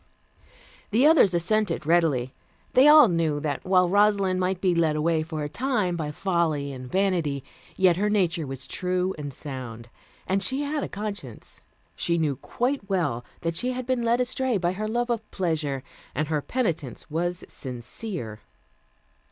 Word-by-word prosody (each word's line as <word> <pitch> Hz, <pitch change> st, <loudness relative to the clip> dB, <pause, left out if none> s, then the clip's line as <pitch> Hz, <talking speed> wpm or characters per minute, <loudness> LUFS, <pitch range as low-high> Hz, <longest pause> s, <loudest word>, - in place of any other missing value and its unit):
The 230 Hz, +6 st, +3 dB
others 295 Hz, -, +6 dB
assented 205 Hz, 0 st, 0 dB
readily. 150 Hz, -7 st, +2 dB, 0.4 s
They 260 Hz, +3 st, +7 dB
all 300 Hz, -3 st, +9 dB
knew 165 Hz, -5 st, 0 dB
that, 145 Hz, -2 st, -2 dB
while 185 Hz, -1 st, +4 dB
Rosalind 200 Hz, -1 st, +3 dB
might 185 Hz, 0 st, 0 dB
be 185 Hz, -2 st, +2 dB
led 165 Hz, -2 st, +2 dB
away 160 Hz, +1 st, +1 dB
for 155 Hz, -1 st, -4 dB
a -, -, -2 dB
time 210 Hz, -, 0 dB
by 155 Hz, -3 st, -3 dB
folly 160 Hz, -4 st, 0 dB
and 130 Hz, -1 st, -9 dB
vanity, 175 Hz, -8 st, 0 dB, 0.3 s
yet 185 Hz, -3 st, +4 dB
her 210 Hz, +2 st, +1 dB
nature 175 Hz, -6 st, +1 dB
was 135 Hz, -1 st, -6 dB
true 180 Hz, +4 st, -1 dB
and 145 Hz, -1 st, -5 dB
sound, 125 Hz, -4 st, -7 dB, 0.4 s
and 195 Hz, +1 st, 0 dB
she 265 Hz, +7 st, -1 dB
had 290 Hz, 0 st, -2 dB
a -, -, -4 dB
conscience. 200 Hz, -, -7 dB, 0.3 s
She 170 Hz, 0 st, +1 dB
knew 155 Hz, -4 st, +1 dB
quite 245 Hz, -, -2 dB
well 145 Hz, -11 st, 0 dB, 0.2 s
that 165 Hz, -1 st, -2 dB
she 250 Hz, +7 st, -1 dB
had 255 Hz, 0 st, -4 dB
been 255 Hz, -1 st, 0 dB
led 235 Hz, +1 st, +2 dB
astray 250 Hz, -1 st, 0 dB
by 175 Hz, -2 st, 0 dB
her 210 Hz, +3 st, -3 dB
love 240 Hz, +2 st, -1 dB
of 225 Hz, -2 st, -3 dB
pleasure, 155 Hz, -7 st, -2 dB, 0.3 s
and 155 Hz, +3 st, -1 dB
her 155 Hz, -2 st, 0 dB
penitence 165 Hz, -, -2 dB
was 175 Hz, +3 st, -1 dB
sincere. 125 Hz, -, -6 dB
175 Hz, 165 wpm, -26 LUFS, 150-210 Hz, 0.4 s, all